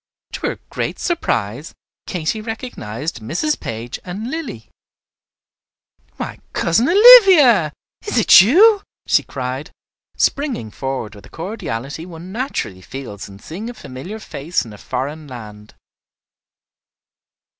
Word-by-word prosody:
To - - -3
her - - -2 0.2
great - - -3
surprise 135 - -2 0.3
Katy 180 +5 -2
recognized 175 - -5
Mrs. 170 - -1
Page 115 +2 -6
and 205 +7 -6
Lilly. 285 - -6 1.5
"Why, - - -6
Cousin 220 +10 +2
Olivia, 365 - +8 0.4
is - - -1
it 220 - +8
you?" 395 - +6 0.2
she - - +3
cried, 130 +4 -5 0.5
springing 270 - 0
forward 130 -5 -4
with 100 - -14
the - - -15
cordiality 160 - -5
one 175 +1 -10
naturally 190 - -4
feels 105 -3 -8
in 100 - -12
seeing 185 - -7
a 245 - -8
familiar 135 - -8
face 170 - -3
in 110 - -11
a 105 - -13
foreign 145 +4 -4
land. 105 -5 -11
160 Hz, 120 wpm, -19 LUFS, -, 1.5 s, Olivia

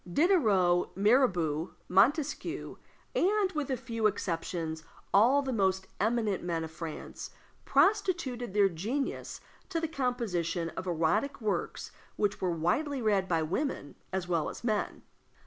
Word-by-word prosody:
Diderot, 200 - +3
Mirabeau, 185 - +2
Montesquieu, 290 - +1 0.4
and, 395 +1 +2
with 280 -6 -2
few 230 -3 0
exceptions, 165 -4 -3 0.3
all 255 +8 +5
the 265 -1 -2
most 190 -3 +1
eminent 220 -2 +1
men 170 -2 -2
of 160 - -6
France, 160 -1 -7 0.4
prostituted 280 - +1
their 205 -1 +6
genius 215 - -3 0.3
to 340 -3 -1
the 325 - -1
composition 215 - -1
of 185 - -6
erotic 180 - +1
works 215 -3 -2 0.2
which 205 0 0
were 185 - +1
widely 220 - 0
read 205 -5 +2
by 165 -3 +1
women 180 - -2 0.2
as 190 -1 -2
well 170 -3 0
as - - -9
men. 215 -3 -1
210 Hz, 130 wpm, -30 LUFS, 175-270 Hz, 0.4 s, their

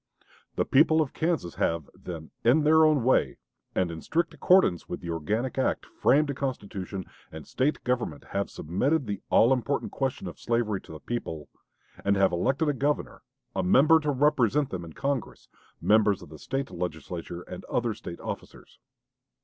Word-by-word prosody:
"The - - +1
people 155 +3 +4
of 150 -4 0
Kansas 160 - -1
have, 80 -3 0
then, 80 -3 -8
'in 130 +7 +4
their 160 +1 +6
own 150 -5 +3
way,' 130 - +2 0.4
and 90 -2 +1
in 80 - -7
strict 170 +2 -1
accordance 180 - +3
with - - -4
the 85 - -5
organic 110 - -2
act, 130 - 0
framed 145 +1 +2
a - - -3
constitution 100 -8 -4 0.3
and 80 -2 -9
State 140 +4 -1
government, 120 - -2
have 100 0 -1
submitted 130 - 0
the 105 -2 -4
all 120 +4 +5
important 135 +2 -1
question 135 -6 -2
of 85 - -8
slavery 115 -4 0
to - - -14
the 80 - -8
people, 80 -10 -5 0.5
and 100 0 +3
have 95 -1 +3
elected 135 - +1
a 145 - +2
governor, 145 +2 -1 0.3
a - - +1
member 145 - +5
to 150 -1 -2
represent 145 -1 +2
them 90 -2 -4
in 80 -2 -10
Congress, 140 - -3 0.3
members 105 -2 +3
of - - -13
the 75 -1 -11
State 135 +1 -3
Legislature, 85 0 -5
and - - -9
other - - -1
State 85 -1 -8
officers. - - -8
120 Hz, 175 wpm, -27 LUFS, 90-140 Hz, 0.5 s, their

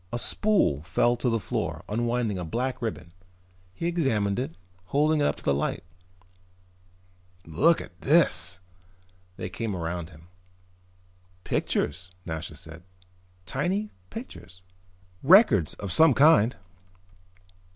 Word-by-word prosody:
A 120 - -2
spool 185 - +2
fell 90 +9 +1
to 125 - 0
the 115 -1 0
floor, - - -4
unwinding 115 -2 -1
a - - -4
black 125 - -3
ribbon. 110 -7 -5 0.6
He 130 - -6
examined 120 - 0
it, 125 -10 -4 0.3
holding 150 - +1
it 145 - +3
up - - 0
to - - -16
the 70 - +2
light. 70 - -2 1.6
"Look 155 - +3
at 85 - -13
this!" 95 - +3 0.8
They - - -5
came 105 +2 -4
around 85 -1 -4
him. 80 +1 -17 1.1
"Pictures," 90 +5 -2 0.2
Nasha 80 -1 -6
said. 80 +1 -11 0.6
"Tiny 185 - -2 0.2
pictures." 90 0 -10 0.6
"Records 135 - +5
of 100 -3 -6
some 160 -5 +5
kind." 140 -5 +5
110 Hz, 120 wpm, -26 LUFS, 85-145 Hz, 1.6 s, Records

